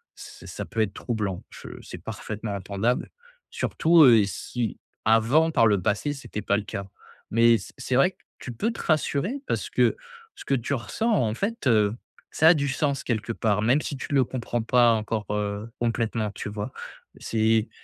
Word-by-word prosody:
c -, -, -12 dB
ça -, -, -6 dB
peut 115 Hz, -, -2 dB
être 100 Hz, -3 st, 0 dB
troublant. 105 Hz, -6 st, -3 dB
Je -, -, -11 dB
c'est -, -, -9 dB
parfaitement 105 Hz, -1 st, -5 dB
entendable, 100 Hz, +6 st, -1 dB, 0.4 s
surtout, 165 Hz, -1 st, +4 dB
heu, 115 Hz, -6 st, +7 dB
si 110 Hz, +2 st, -4 dB, 0.3 s
avant, 115 Hz, +9 st, +4 dB
par 125 Hz, -8 st, +3 dB
le 100 Hz, -3 st, +2 dB
passé, 110 Hz, +7 st, 0 dB
c’était 135 Hz, -6 st, -6 dB
pas 100 Hz, 0 st, +1 dB
le 105 Hz, -, -3 dB
cas. 100 Hz, -1 st, -6 dB, 0.4 s
Mais, 115 Hz, +1 st, +5 dB
c’est 95 Hz, -, -10 dB
c'est 130 Hz, -1 st, -2 dB
vrai 140 Hz, +8 st, +4 dB
que -, -, -35 dB, 0.2 s
tu 125 Hz, -, -7 dB
peux 220 Hz, -, -1 dB
te -, -, -7 dB
rassurer, 165 Hz, -, 0 dB
parce -, -, -2 dB
que -, -, +2 dB, 0.4 s
ce -, -, -11 dB
que 135 Hz, -, +2 dB
tu 130 Hz, +3 st, -2 dB
ressens, 220 Hz, -, -1 dB
en 115 Hz, -, +1 dB
fait, 220 Hz, -, -2 dB
heu, 105 Hz, -3 st, +3 dB, 0.4 s
ça 160 Hz, -, +4 dB
a -, -, +8 dB
du 145 Hz, -2 st, 0 dB
sens 140 Hz, 0 st, -1 dB
quelque 115 Hz, -1 st, -2 dB
part, 105 Hz, -2 st, 0 dB
même 125 Hz, +7 st, +3 dB
si 140 Hz, -, -4 dB
tu -, -, -6 dB
le 135 Hz, -, +5 dB
comprends 120 Hz, -1 st, -3 dB
pas 120 Hz, 0 st, +4 dB
encore, 110 Hz, 0 st, -2 dB
heu, 105 Hz, +1 st, -2 dB
complètement, 115 Hz, -2 st, -1 dB
tu 105 Hz, -, -6 dB
vois? 105 Hz, +4 st, -5 dB, 0.5 s
C'est 110 Hz, 0 st, +1 dB
115 Hz, 190 wpm, -25 LUFS, 105-135 Hz, 0.5 s, a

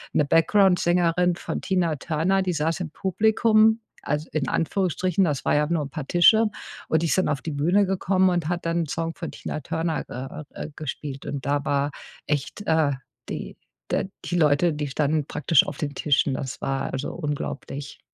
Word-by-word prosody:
'ne 150 Hz, -, +3 dB
Backgroundsängerin 175 Hz, 0 st, +3 dB
von -, -, -4 dB
Tina 180 Hz, -4 st, +1 dB
Turner, 170 Hz, +6 st, +1 dB
die 185 Hz, -1 st, -1 dB
saß 165 Hz, +3 st, -1 dB
im 160 Hz, -4 st, -4 dB
Publikum, 220 Hz, +4 st, +3 dB, 0.3 s
al 150 Hz, +1 st, -1 dB
in 145 Hz, -4 st, -1 dB
Anführungsstrichen, 185 Hz, +2 st, +1 dB
das 145 Hz, -5 st, -1 dB
war -, -, +2 dB
ja 150 Hz, 0 st, +2 dB
nur 155 Hz, -4 st, -1 dB
paar 150 Hz, -4 st, -5 dB
Tische. 220 Hz, +6 st, +6 dB, 0.4 s
Und 160 Hz, +1 st, +2 dB
die -, -, +1 dB
ist 165 Hz, -, +1 dB
dann 185 Hz, -, +2 dB
auf 140 Hz, -4 st, -1 dB
die 160 Hz, -, -4 dB
Bühne 175 Hz, +8 st, +3 dB
gekommen 190 Hz, 0 st, +2 dB
und 175 Hz, -3 st, 0 dB
hat 175 Hz, 0 st, -2 dB
dann 170 Hz, 0 st, +1 dB
'n -, -, -8 dB
Song 165 Hz, +3 st, -3 dB
von 165 Hz, -, -5 dB
Tina -, -, -5 dB
Turner, 165 Hz, +2 st, -2 dB, 0.5 s
äh, -, -, -6 dB
äh, -, -, -11 dB
gespielt. 145 Hz, -2 st, -6 dB
Und 140 Hz, -2 st, -4 dB
da 145 Hz, 0 st, 0 dB
war 145 Hz, +1 st, +1 dB, 0.4 s
echt, 150 Hz, +7 st, -2 dB
äh, 160 Hz, -3 st, +3 dB, 0.4 s
die -, -, -6 dB, 0.4 s
de 190 Hz, -, 0 dB, 0.2 s
die 175 Hz, -, -2 dB
Leute, 155 Hz, +1 st, +3 dB
die 150 Hz, 0 st, -3 dB
standen 150 Hz, +2 st, 0 dB
praktisch 155 Hz, -1 st, +3 dB
auf 145 Hz, -, -5 dB
den 145 Hz, -2 st, -3 dB
Tischen. 145 Hz, -2 st, +2 dB
Das 130 Hz, -1 st, -5 dB
war 135 Hz, 0 st, -2 dB
also 135 Hz, +1 st, -3 dB
unglaublich. 145 Hz, -2 st, -5 dB
160 Hz, 185 wpm, -24 LUFS, 145-180 Hz, 0.5 s, Tische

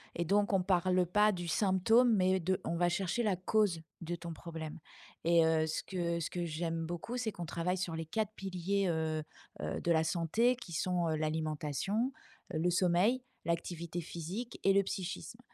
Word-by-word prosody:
et 170 Hz, -, -1 dB
donc, 205 Hz, +3 st, +2 dB
on 190 Hz, -, +3 dB
parle 180 Hz, -1 st, +3 dB
pas 210 Hz, +4 st, +4 dB
du 175 Hz, -1 st, -4 dB
symptôme 220 Hz, +6 st, +4 dB
mais 185 Hz, 0 st, +3 dB
de 185 Hz, +2 st, 0 dB
on 170 Hz, -, -2 dB
va 175 Hz, 0 st, +3 dB
chercher 190 Hz, +6 st, 0 dB
la 205 Hz, -3 st, +2 dB
cause 185 Hz, -2 st, +1 dB, 0.2 s
de 170 Hz, +1 st, -3 dB
ton 170 Hz, 0 st, -7 dB
problème 160 Hz, -1 st, -7 dB, 0.5 s
et 170 Hz, -1 st, +5 dB
heu, 160 Hz, -1 st, +3 dB
ce 155 Hz, -, -2 dB
que 170 Hz, -3 st, -1 dB
ce -, -, -2 dB
que 175 Hz, -1 st, -3 dB
j'aime 165 Hz, 0 st, -2 dB
beaucoup, 175 Hz, +9 st, -4 dB
c'est 230 Hz, -3 st, -1 dB
qu'on 175 Hz, -, -5 dB
travaille 180 Hz, +3 st, -1 dB
sur 175 Hz, -2 st, -2 dB
les 165 Hz, 0 st, -3 dB
4 215 Hz, +4 st, -2 dB
piliers, 195 Hz, +1 st, -1 dB
heu 160 Hz, -1 st, 0 dB, 0.4 s
heu, -, -, -3 dB
de 170 Hz, -, +1 dB
la 160 Hz, -1 st, +4 dB
santé 195 Hz, +9 st, +2 dB
qui 235 Hz, -8 st, -11 dB
sont, 175 Hz, 0 st, 0 dB
heu, 155 Hz, -, +1 dB
l'alimentation, 155 Hz, -, -1 dB, 0.4 s
heu, -, -, 0 dB
le 175 Hz, -, +2 dB
sommeil, 185 Hz, +8 st, +3 dB, 0.2 s
l'activité 170 Hz, 0 st, -2 dB
physique 180 Hz, +9 st, -6 dB
et 195 Hz, -, +5 dB
le 200 Hz, -, +5 dB
psychisme 195 Hz, +4 st, -5 dB
175 Hz, 190 wpm, -33 LUFS, 165-195 Hz, 0.5 s, et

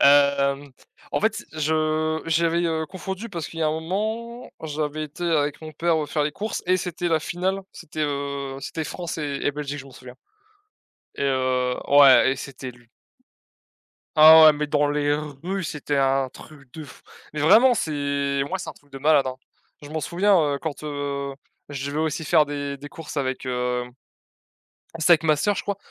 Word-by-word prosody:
Hem, 140 Hz, -1 st, +4 dB
t -, -, -25 dB, 0.3 s
en -, -, -1 dB
fait -, -, +2 dB
c -, -, -7 dB
je 155 Hz, 0 st, 0 dB
j'avais, 165 Hz, +1 st, +2 dB
heu, 160 Hz, -1 st, -1 dB
confondu 190 Hz, +5 st, -6 dB
parce 170 Hz, -5 st, -5 dB
qu'il 165 Hz, -, -10 dB
y -, -, +1 dB
a -, -, +3 dB
un -, -, +1 dB
moment, 220 Hz, +7 st, -4 dB
j'avais 155 Hz, 0 st, -3 dB
été 155 Hz, +4 st, -7 dB
avec 150 Hz, -3 st, 0 dB
mon 155 Hz, 0 st, -8 dB
père, 165 Hz, +2 st, +1 dB
heu, -, -, -4 dB
faire 150 Hz, 0 st, -1 dB
les 150 Hz, -, -2 dB
courses 215 Hz, +4 st, -4 dB
et 185 Hz, 0 st, +3 dB
c'était 175 Hz, -1 st, -3 dB
la 160 Hz, -1 st, +2 dB
finale, 185 Hz, +4 st, -2 dB
c'était, 155 Hz, +1 st, -6 dB
heu, 140 Hz, -1 st, -4 dB
c'était 160 Hz, +1 st, -4 dB
France 170 Hz, +5 st, -5 dB
et 145 Hz, -2 st, -3 dB
et -, -, +2 dB
Belgique 145 Hz, 0 st, -5 dB
je 135 Hz, -, -9 dB
m'en 135 Hz, -, -14 dB
souviens 125 Hz, 0 st, -12 dB, 1.0 s
et -, -, -3 dB
heu, 130 Hz, -2 st, +1 dB
ouais 140 Hz, -2 st, +7 dB
et -, -, -1 dB
c'était 130 Hz, -1 st, -8 dB
lu 120 Hz, -1 st, -22 dB, 1.3 s
Ah 160 Hz, +1 st, +10 dB
ouais, 155 Hz, -, +8 dB
mais 150 Hz, 0 st, -2 dB
dans 145 Hz, 0 st, +1 dB
les 145 Hz, 0 st, +1 dB, 0.3 s
rues, 190 Hz, +1 st, -2 dB
c'était 145 Hz, -1 st, -3 dB
un 135 Hz, -1 st, +2 dB
truc 135 Hz, -3 st, -15 dB
de 155 Hz, -2 st, -8 dB
f -, -, -15 dB, 0.3 s
mais 150 Hz, -, -3 dB
vraiment 240 Hz, +11 st, +6 dB
c'est 140 Hz, -5 st, -1 dB
moi -, -, -2 dB
c'est -, -, -6 dB
un -, -, -8 dB
truc 145 Hz, -, -24 dB
de 135 Hz, -, -7 dB
malade, 145 Hz, -1 st, +3 dB
hein. 130 Hz, -, -4 dB, 0.5 s
Je 145 Hz, -, -10 dB
m'en 155 Hz, 0 st, -3 dB
souviens, 185 Hz, +4 st, +2 dB
heu, -, -, -1 dB
quand, 155 Hz, 0 st, -6 dB
heu, 140 Hz, -2 st, -4 dB, 0.3 s
je 140 Hz, 0 st, -5 dB
vais 150 Hz, -, -4 dB
aussi 160 Hz, 0 st, -1 dB
faire 155 Hz, 0 st, +4 dB
des 145 Hz, -1 st, -4 dB
des 145 Hz, +1 st, -9 dB
courses 155 Hz, 0 st, -9 dB
avec, 130 Hz, -1 st, -2 dB
heu, 125 Hz, -1 st, -1 dB, 1.1 s
c'était 160 Hz, +2 st, +3 dB
avec 165 Hz, -1 st, +6 dB
ma 155 Hz, -1 st, +4 dB
soeur 205 Hz, +8 st, +1 dB
je -, -, -2 dB
crois, 200 Hz, -1 st, -3 dB
150 Hz, 200 wpm, -24 LUFS, 140-160 Hz, 1.3 s, Ah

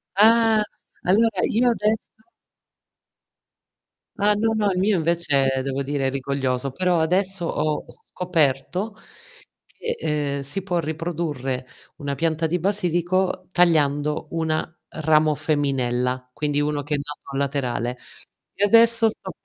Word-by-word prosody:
Ah! 225 Hz, +1 st, +5 dB, 0.4 s
Allora 210 Hz, +2 st, +3 dB
io 245 Hz, +3 st, +3 dB
adesso 220 Hz, -1 st, 0 dB, 2.1 s
Ah, 205 Hz, +1 st, +3 dB
no, 220 Hz, +2 st, +1 dB
no 210 Hz, -2 st, +1 dB
il 180 Hz, -, -2 dB
mio 195 Hz, 0 st, +2 dB
invece 145 Hz, -5 st, +2 dB
devo 135 Hz, 0 st, -2 dB
dire 140 Hz, -1 st, -1 dB
è -, -, +2 dB
rigoglioso, 135 Hz, -1 st, -2 dB
però 180 Hz, +3 st, +1 dB
adesso 185 Hz, +2 st, +1 dB
ho 155 Hz, -2 st, -1 dB
scoperto 180 Hz, +4 st, -1 dB, 0.7 s
che, 475 Hz, 0 st, -5 dB, 0.4 s
ehm, 140 Hz, -, -3 dB
si 140 Hz, +8 st, -4 dB
può 180 Hz, -2 st, -1 dB
riprodurre 155 Hz, -5 st, -3 dB, 0.3 s
una 140 Hz, -1 st, -3 dB
pianta 160 Hz, +2 st, 0 dB
di 170 Hz, +3 st, 0 dB
basilico 185 Hz, -1 st, 0 dB
tagliando 150 Hz, -3 st, +2 dB
una 160 Hz, -1 st, -1 dB, 0.3 s
ramo 155 Hz, 0 st, +3 dB
femminella, 130 Hz, -4 st, -1 dB
quindi 145 Hz, 0 st, -1 dB
uno 145 Hz, 0 st, -1 dB
che 150 Hz, +1 st, -2 dB
è -, -, 0 dB
nato 140 Hz, -1 st, -7 dB
laterale. 125 Hz, -3 st, -1 dB, 0.6 s
E 200 Hz, -, 0 dB
adesso 230 Hz, +1 st, +5 dB
sto 220 Hz, -, -7 dB
160 Hz, 125 wpm, -23 LUFS, 140-190 Hz, 2.1 s, Ah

